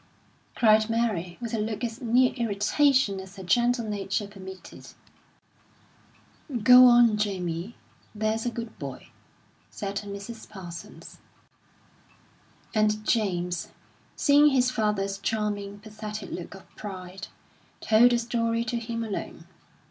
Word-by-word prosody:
cried 215 -1 +4
Mary, 210 -7 -1
with 235 -2 -5
a 225 - 0
look 215 +1 -3
as 230 +2 -4
near 250 +1 +3
irritation 230 0 +2
as 190 +1 -10
her 190 - -9
gentle 240 +5 +2
nature 205 0 -2
permitted. 190 -2 -11 1.8
"Go 250 +1 +9
on, 240 -3 +6
Jamie, 185 -1 -3 0.4
there's 215 +1 -1
a 245 - 0
good 230 -1 -7
boy," 135 -3 -8 0.6
said 200 -1 -5
Mrs. 200 +2 -7
Parsons. 175 -4 -10 1.5
And 215 -1 +1
James, 180 -6 0 0.5
seeing 290 +1 +5
his 255 -3 +3
father's 205 -4 -1
charming, 205 -1 -2
pathetic 215 -1 -8
look 180 +2 -7
of 195 - -14
pride, 190 -1 -8 0.5
told 225 +3 +5
the 240 - +2
story 230 -1 -1
to 240 0 -2
him 230 0 -4
alone. 215 -3 -6
215 Hz, 120 wpm, -26 LUFS, 195-235 Hz, 1.8 s, Go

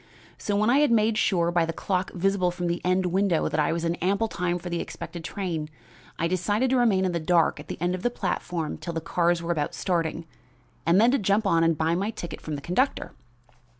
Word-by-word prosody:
So 205 - -1
when 215 +3 +3
I 270 - +5
had 295 - +4
made 225 -1 +3
sure 170 -3 +2
by 175 -1 +2
the 165 0 -2
clock 185 +2 -2
visible 190 0 +1
from 175 0 -4
the 170 0 -1
end 185 +1 +2
window 180 -1 +1
that 155 - -1
I 150 - +2
was 170 0 -2
in 165 - +1
ample 200 +5 +1
time 175 -4 -1
for 180 - -8
the 170 -1 -2
expected 165 +1 -7
train, 165 -5 -3 0.5
I 165 - 0
decided 205 +8 0
to 260 - +3
remain 210 -6 +3
in 185 - 0
the 170 - -1
dark 165 +1 +2
at - - -10
the - - -6
end 175 +2 0
of 185 - -4
the 245 - +1
platform 175 -8 -3
till 170 - -5
the 165 - -1
cars 170 +1 0
were 170 - -1
about 150 -3 -1
starting, 165 -2 -1 0.6
and 170 +3 +5
then 235 +3 +5
to 275 - +2
jump 205 +2 +1
on 165 -4 +3
and 165 -1 +2
buy 160 +2 +1
my 195 +5 0
ticket 170 -8 -7
from 155 - -4
the 140 - -6
conductor. 190 - 0
175 Hz, 240 wpm, -26 LUFS, 170-200 Hz, 0.6 s, I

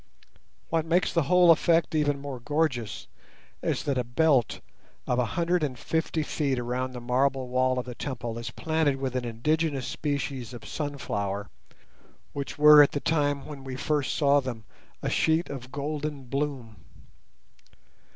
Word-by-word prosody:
What 165 -1 +1
makes 170 +3 +1
the 170 - +3
whole 180 -1 +7
effect 165 +1 +3
even 145 -2 +1
more 140 -2 -6
gorgeous 145 -4 -1 0.6
is - - -1
that 140 -3 0
a - - 0
belt 125 -1 +2 0.5
of 125 - 0
a 125 - +2
hundred 175 +1 +2
and 135 -4 -2
fifty 160 +2 -1
feet 140 -3 -1
around 125 +1 -2
the 125 - -6
marble 130 +2 0
wall 130 0 +2
of 125 - -2
the 125 - -6
temple 120 -3 -5
is 115 - -5
planted 160 -3 0
with 135 -1 -4
an 125 -1 -1
indigenous 140 +4 0
species 135 -4 -3
of 120 - -10
sunflower, 100 -9 -3 0.8
which 140 -1 -5
were 150 0 +9
at 145 - +4
the 145 - -1
time 145 -3 0
when 145 -3 -9
we 130 -1 -6
first 145 +1 -1
saw 145 -1 +4
them 125 -5 -5 0.4
a - - 0
sheet 160 +1 +1
of 130 -2 -8
golden 145 0 -4
bloom. 130 -4 -3
140 Hz, 160 wpm, -27 LUFS, 125-150 Hz, 0.8 s, were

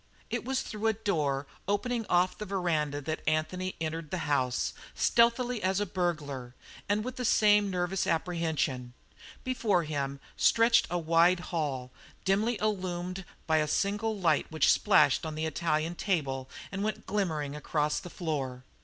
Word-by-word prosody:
It - - -1
was 265 0 -1
through 215 +1 -3
a 220 - +3
door 155 -10 -1 0.2
opening 225 +3 -1
off 180 +1 +3
the 210 - -6
veranda 160 -7 0
that 155 +2 -3
Anthony 160 +4 0
entered 160 -1 -3
the 185 - -3
house, 130 -4 0 0.2
stealthily 240 0 +3
as 190 +1 +1
a 205 - 0
burglar, 150 -9 -3 0.3
and 210 +1 +2
with 255 +2 -5
the 250 - -3
same 210 -3 +4
nervous 180 0 -1
apprehension. 160 -7 -1 0.5
Before 225 -8 +1
him 140 -3 -3 0.2
stretched 230 +1 +4
a 175 - 0
wide 170 +2 +4
hall, 135 -6 -2 0.3
dimly 210 +5 +2
illumined 185 -3 -2 0.2
by 160 -1 +3
a 155 -1 +2
single 205 +6 0
light 180 -4 +1
which 160 - +4
splashed 205 -3 +4
on 160 -1 -4
the 155 +1 -2
Italian 160 +1 0
table 140 -9 -1 0.2
and 195 +1 -3
went 215 -1 -3
glimmering 160 -8 -1
across 150 0 0
the 175 - -9
floor. 135 -8 -3
175 Hz, 155 wpm, -30 LUFS, 150-205 Hz, 0.5 s, same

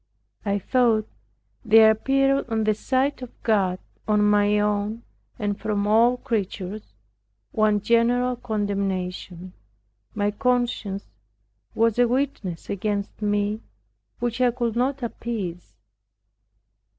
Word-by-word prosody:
I 200 -1 0
thought 225 +1 +2 0.6
there 220 -1 +7
appeared 270 +4 +1
on 220 -1 0
the 215 0 +3
side 260 +5 0
of 250 - -6
God, 195 -5 +2 0.3
on 210 -1 +3
my 210 0 +3
own, 210 +2 -1 0.3
and 205 -2 -2
from 205 -1 -1
all 230 +4 +4
creatures, 210 -4 -4 0.6
one 215 -2 +2
general 240 +3 +2
condemnation, 195 -5 -3 0.6
my 205 0 +1
conscience 240 -4 -1 0.7
was 230 0 +2
a 245 - +5
witness 245 -9 -2
against 200 +1 -3
me, 205 +1 0 0.6
which 240 0 -2
I 250 - +5
could 235 -2 -2
not 260 +2 0
appease. 210 -7 -5
215 Hz, 110 wpm, -24 LUFS, 205-240 Hz, 0.7 s, there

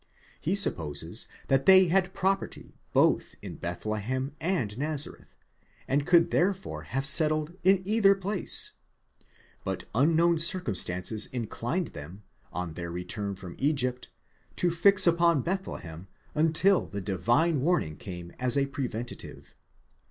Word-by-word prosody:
He 180 +5 -1
supposes 85 - 0 0.2
that 135 -1 +1
they 190 0 +8
had 185 +1 +1
property 195 0 -2 0.2
both - - +2
in - - -7
Bethlehem 110 +9 -3
and 160 - -1
Nazareth, 150 +2 -4 0.5
and 140 +1 0
could 170 -1 +4
therefore 190 +1 0
have 135 +2 -2
settled 155 +1 +2
in 190 0 +4
either 200 -1 +4
place, 195 -1 0 0.9
but - - -4
unknown 165 +6 +3
circumstances 110 - +1
inclined 125 - -3
them, 85 +8 -10 0.3
on 90 -2 -4
their 85 +1 -6
return 100 +3 -4
from 90 -2 -9
Egypt, 125 -3 0 0.5
to 175 - +1
fix 190 +3 +5
upon 170 -4 +3
Bethlehem 95 - -5 0.3
until 165 +5 +2
the 100 - -5
divine 120 - +1
warning 145 - 0
came 90 -2 -8
as 125 +1 +2
a 140 - +3
preventive. 125 -4 -6
140 Hz, 120 wpm, -28 LUFS, 105-175 Hz, 0.9 s, they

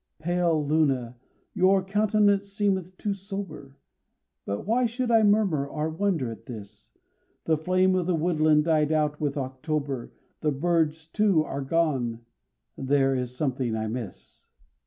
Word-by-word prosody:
Pale 170 -1 0
Luna! 135 -6 +1 0.4
your 190 0 +3
countenance 205 0 +2
seemeth 190 -3 -1
too 205 - -2
sober, 195 -8 -8 0.7
But 100 +1 -3
why 240 +4 +2
should 240 +1 -2
I 225 -1 +6
murmur 205 -9 +2
or 155 +2 -3
wonder 160 - -1
at 115 0 -11
this? 105 -5 -10 0.6
The 160 - +3
flame 185 +4 +2
of 180 -2 0
the 180 - +2
woodland 155 -2 +3
died 155 -2 +2
out 150 -1 0
with 145 -1 -1
October, 135 0 -3 0.3
The 150 - 0
birds, 160 +1 0
too, 190 -1 +2
are 140 -2 -5
gone 135 -6 0 0.5
there 135 0 +2
is 125 -1 -3
something 130 -4 -1
I 110 0 -2
miss. 115 -3 -8
155 Hz, 140 wpm, -26 LUFS, 135-190 Hz, 0.7 s, I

